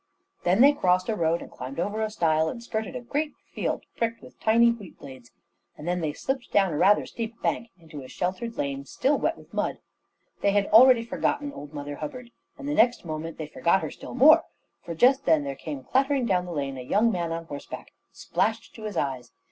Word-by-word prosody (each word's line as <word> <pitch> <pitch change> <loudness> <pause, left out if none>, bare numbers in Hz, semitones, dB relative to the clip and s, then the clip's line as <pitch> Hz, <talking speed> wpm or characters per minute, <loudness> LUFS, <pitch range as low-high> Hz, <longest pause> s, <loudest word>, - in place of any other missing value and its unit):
Then 185 +5 +4
they 285 +2 +8
crossed 185 -6 +1
a 220 - +1
road, 165 -2 0
and - - -13
climbed 130 +4 -7
over 210 +5 -1
a 220 - 0
stile, 160 -5 +1
and 235 +7 -7
skirted 220 -3 -4
a - - -4
great 295 +5 -2 0.2
field - - -2
pricked 230 0 -2
with - - -15
tiny 235 +2 +5
wheat 210 -7 -9
blades; 130 -3 -12 0.5
and 150 - -9
then 180 0 0
they 155 -2 -1
slipped 265 - -4
down 195 -4 +3
a - - -2
rather 195 +5 +4
steep 230 0 -6
bank 235 - -1
into 160 -4 -10
a 130 - -10
sheltered 210 - -3
lane 140 -1 -2
still 275 - 0
wet - - 0
with - - -17
mud. - - -1 0.6
They 200 - +2
had 205 -1 +3
already 240 +1 +7
forgotten 285 +4 -1
old 145 0 -9
Mother 145 0 -5
Hubbard, 250 -4 -7 0.3
and 280 - -7
the 295 - -1
next 250 - +3
moment 160 0 -5
they 155 - -4
forgot 170 +5 +1
her - - -4
still - - -9
more; 310 +5 +7 0.4
for 170 - -6
just 265 - +4
then 160 -3 +4
there 140 -1 -3
came 140 -1 -7
clattering 270 - +1
down 180 -5 +1
the 175 - -7
lane 140 -4 -3
a - - -5
young 215 - +2
man 170 -4 -2
on 165 0 -4
horseback, 145 -3 -8 0.2
splashed 220 +1 -2
to 220 - -9
his 210 -5 -4
eyes. 130 -4 -3
190 Hz, 220 wpm, -26 LUFS, 155-235 Hz, 0.6 s, they